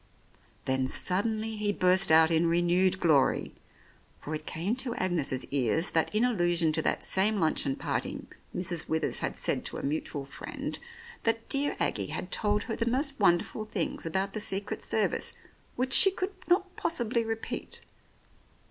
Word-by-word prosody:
Then 130 0 0
suddenly 215 +8 -1
he 210 -1 0
burst 185 -2 +3
out 160 +1 +6
in 165 +1 +3
renewed 175 +2 +2
glory, 150 -7 +2 0.7
for 150 - -6
it 155 - -5
came 185 +8 -2
to 255 -2 -3
Agnes's 160 -8 0
ears 140 +4 +1
that 165 +5 +1
in 215 - +4
allusion 175 -8 +2
to 160 - 0
that - - -1
same 205 +2 +1
luncheon 155 -4 0
party - - -3 0.3
Mrs. 175 -2 -3
Withers 160 -1 0
had - - -3
said - - -1
to - - -3
a - - -6
mutual 145 -1 -2
friend - - -6 0.4
that 225 0 -1
dear 285 +1 +1
Aggie - - 0
had 180 - -5
told 210 -1 +1
her 225 - -4
the 230 - -2
most 275 +3 0
wonderful 175 +5 +2
things 210 -6 -3
about 190 +4 -2
the - - -3
Secret 200 -1 -2
Service - - -1 0.4
which 255 +1 0
she 390 - +10
could 380 +1 -4
not 370 +1 +1
possibly 240 -7 0
repeat. 225 0 -5
190 Hz, 160 wpm, -29 LUFS, 160-225 Hz, 0.7 s, she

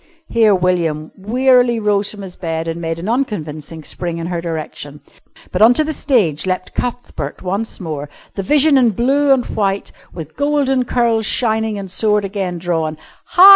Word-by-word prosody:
Here 220 -3 +4
William 170 -4 0
wearily 245 +3 +3
rose 205 -1 +1
from 205 -2 -8
his 185 -2 -8
bed 165 -1 -3
and 165 +1 -3
made 165 -1 -2
an 170 +4 -6
unconvincing 160 - -3
spring 170 +2 -4
in 165 - -4
her 170 - -2
direction. 155 -3 -6 0.5
But 185 - -1
on 230 +3 +7
to 310 - +4
the 310 +1 -3
stage 190 - +1
leapt 185 0 -2
Cuthbert 245 0 -4
once 200 +5 -3
more, 150 -5 -5 0.2
the 195 - -3
vision 290 +6 +4
in 245 -2 +5
blue 275 +4 +3
and 260 -3 +3
white 200 -1 -1 0.2
with 160 -3 -9
golden 280 -3 +1
curls 230 -3 +1
shining 220 -2 +1
and 195 -2 -6
sword 210 +1 +2
again 190 -3 -3
drawn. 165 -3 -1 0.4
"Ha! 370 +2 +10
200 Hz, 175 wpm, -18 LUFS, 170-245 Hz, 0.5 s, Ha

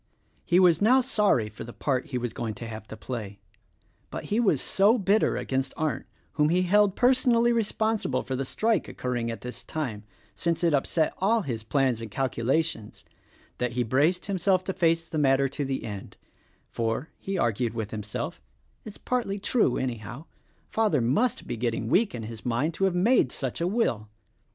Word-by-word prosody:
He 175 - +3
was 175 -2 +5
now 245 +5 +6
sorry 210 - +2
for 105 +1 -9
the 120 +1 -9
part 130 -3 -1
he 130 - -3
was 120 -1 -3
going 110 -2 -4
to 115 - -7
have 110 -1 -8
to 110 - -9
play; 105 -3 -6 0.7
but - - -6
he 215 - 0
was 195 - +3
so 205 +5 +3
bitter 205 0 +2
against 135 0 -2
Arndt, 155 -1 -2 0.2
whom 150 0 +2
he 180 +2 +3
held 205 +1 +3
personally 245 -2 +4
responsible 220 - 0
for 130 - -3
the 135 - -1
strike 220 - 0
occurring 120 -2 -3
at 115 -3 -5
this 125 0 -7
time, 125 -10 -4 0.2
— - - -33
since 170 0 -1
it 165 -2 +3
upset 155 +3 +1
all 220 +3 +2
his 120 -8 -3
plans 125 0 +1
and 115 - -6
calculations 130 +1 -1 0.3
— - - -31
that 125 -1 -1
he 125 0 +1
braced 145 +10 +2
himself 190 -1 +1
to 190 - -3
face 165 -1 +1
the 160 - -2
matter 135 -1 +3
to 145 - -3
the 135 -1 -3
end; 105 -4 -7 0.3
— - - -38
for, 115 +6 -2
he 195 0 -3
argued 120 - 0
with 110 -2 -4
himself, 105 - -5 0.4
"It's 215 - -9
partly 235 -6 -1
true 205 - +1
anyhow: 120 +2 -4 0.5
Father 215 -10 +2
must 145 - +1
be 120 - -4
getting 115 -1 -2
weak 195 - +2
in 115 - -5
his 110 -1 -8
mind 125 +7 0
to 195 - 0
have 190 -2 +1
made 190 - +3
such 130 +3 -4
a 170 - +1
will." 150 - 0
140 Hz, 190 wpm, -27 LUFS, 115-195 Hz, 0.7 s, now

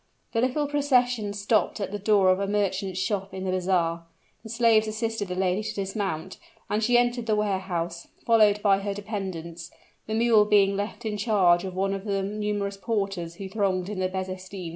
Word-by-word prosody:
The 230 - 0
little 260 +4 +1
procession 250 -7 +1
stopped 205 +1 0
at 200 - -3
the 205 - -4
door 200 -2 +4
of 185 - +1
a 200 - -1
merchant's 195 -2 -1
shop 195 0 -2
in 190 - -5
the 190 - -1
bazaar; 175 -2 0 0.4
the 225 - -11
slaves 230 -1 +3
assisted 220 -1 -2
the 180 - -4
lady 185 +1 +1
to 215 - -5
dismount, 190 -3 -3 0.3
and 215 +2 +1
she 240 +2 +4
entered 240 -1 +1
the 215 - +2
warehouse, 185 -5 -2 0.2
followed 215 -3 +4
by 195 -2 +4
her 200 0 -3
dependents, 180 -5 -6 0.4
the 220 - -2
mule 225 -2 +4
being 200 -1 +4
left 205 +4 -4
in 210 -1 -2
charge 190 -5 +3
of 185 -1 -6
one 195 +1 0
of 195 +1 -5
the 195 -2 -1
numerous 205 -1 -2
porters 195 -6 -3
who 195 +2 -7
thronged 190 -2 -1
in 210 -2 -4
the 185 0 0
bezestein. 185 -1 -5
200 Hz, 190 wpm, -26 LUFS, 185-215 Hz, 0.4 s, door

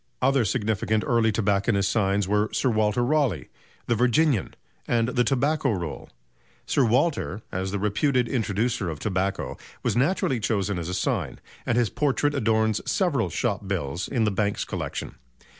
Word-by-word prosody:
Other 135 -2 +3
significant 110 -1 0
early 115 -2 +3
tobacconists' 100 -1 +1
signs 100 -3 +1
were 105 +2 +1
"Sir 130 - +1
Walter 110 +2 +1
Raleigh," 130 - 0 0.4
"The - - +1
Virginian" 125 +1 +2 0.3
and 115 0 +1
"The 125 -1 +2
Tobacco 140 +3 +1
Roll." 85 -5 -5 0.6
"Sir 140 - +2
Walter," 125 - +1
as 95 +1 -2
the 100 - -2
reputed 120 +5 +1
introducer 115 -3 -1
of 80 - -4
tobacco, 95 +3 -2 0.3
was - - 0
naturally 135 -1 +1
chosen 100 -3 -1
as 85 0 -4
a 90 - -2
sign, 90 - -2 0.3
and 120 - +1
his 120 -3 +2
portrait 145 0 +1
adorns 110 -4 +1
several 140 - +1
shop 95 - -2
bills 85 -4 -2
in 120 -4 0
the 105 - +2
Banks 100 +1 -1
Collection. - - -5
110 Hz, 155 wpm, -25 LUFS, 100-125 Hz, 0.6 s, Other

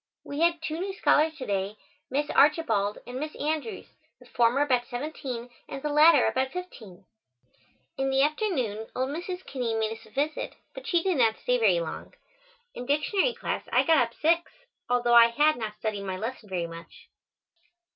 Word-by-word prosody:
We 285 - -6
had 335 0 +2
two 320 -1 -3
new 385 +1 -3
scholars 315 -4 +3
to 260 - -6
day, 200 +1 -2 0.3
Miss 290 +3 0
Archibald 285 -10 +3
and 250 +1 -6
Miss 305 +1 -5
Andrews, 315 +8 -3 0.3
the - - -17
former 240 +3 +2
about 250 -4 +1
seventeen 250 -2 -5 0.2
and 275 - -7
the 300 - -1
latter 300 -2 +7
about 260 0 0
fifteen. 230 - -9 0.9
In 270 0 +1
the 270 0 +3
afternoon 280 - -1
old 260 +1 -1
Mrs. 355 +5 -5
Kinney 245 -4 -2
made 220 -1 0
us 225 0 -9
a - - -17
visit, 285 +7 -2 0.2
but - - -9
she 345 -2 +2
did 370 -5 +1
not 225 -2 +3
stay 250 0 0
very 195 -6 +4
long. 165 -2 -6 0.6
In 245 - -7
dictionary 375 - +1
class - - -3
I - - +4
got 325 -1 +4
up 235 -1 0
sixth, 335 +2 +1 0.3
although 240 -1 +2
I 235 -1 +9
had 295 +6 +3
not 215 -2 -5
studied 215 -2 -3
my 190 -1 -3
lesson 225 +1 -6
very 180 -2 -2
much. 170 - -11
265 Hz, 180 wpm, -27 LUFS, 225-315 Hz, 0.9 s, I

